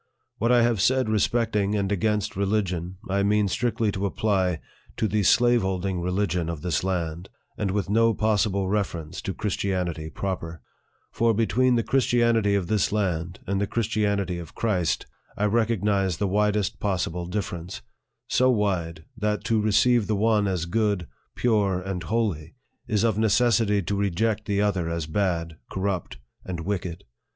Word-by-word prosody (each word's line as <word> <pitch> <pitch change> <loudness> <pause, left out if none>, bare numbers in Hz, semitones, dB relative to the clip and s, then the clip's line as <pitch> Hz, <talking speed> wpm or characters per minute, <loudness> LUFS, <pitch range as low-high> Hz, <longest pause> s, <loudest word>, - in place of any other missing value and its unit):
What 115 +3 +2
I 120 -1 +5
have 115 -5 +2
said 130 +1 +2
respecting 105 -1 +1
and 100 -1 -1
against 105 +1 0
religion, 95 -3 -1
I 100 +1 +1
mean 105 +1 +2
strictly 115 +1 0
to 100 +1 -1
apply 95 -5 0 0.4
to 110 - +1
the 105 +1 +1
slaveholding 95 -5 +2
religion 90 -2 -1
of 85 -2 -5
this 90 -2 0
land, 90 -2 -2 0.3
and 105 - -2
with 100 0 -1
no 115 +2 +3
possible 105 -2 +1
reference 90 -6 -2
to 95 - -4
Christianity 90 -6 -2
proper; 85 -3 -5 0.5
for, 115 -1 +2
between 125 +3 +2
the 115 - +1
Christianity 115 -5 +2
of 100 -3 0
this 105 +2 +1
land, 90 -4 -2
and 100 +1 -1
the 100 - 0
Chris 115 0 -1
tianity 100 -5 0
of 85 - -12
Christ, 95 -8 0 0.3
I 105 - +1
recognize 105 -4 +1
the 100 - 0
widest 105 +1 +1
possible 90 -3 -2
differ 100 0 -3
ence 90 +4 -8 0.4
so 130 +1 +3
wide, 90 -8 -1
that 105 -1 -1
to 110 -2 +1
receive 110 +2 +3
the 110 - +1
one 105 0 +2
as 90 -3 -1
good, 105 -1 0 0.3
pure, 105 -6 +1
and 90 -1 -4
holy, 90 - -2 0.3
is 110 -3 +1
of 110 -3 +1
necessity 110 -1 +3
to 100 +4 -2
reject 100 +3 0
the 100 0 0
other 95 -5 0
as 85 -1 -2
bad, 85 -2 -1
corrupt, 95 -2 -3 0.3
and 90 -3 -5
wicked. 90 -2 -3
100 Hz, 160 wpm, -25 LUFS, 90-110 Hz, 0.5 s, I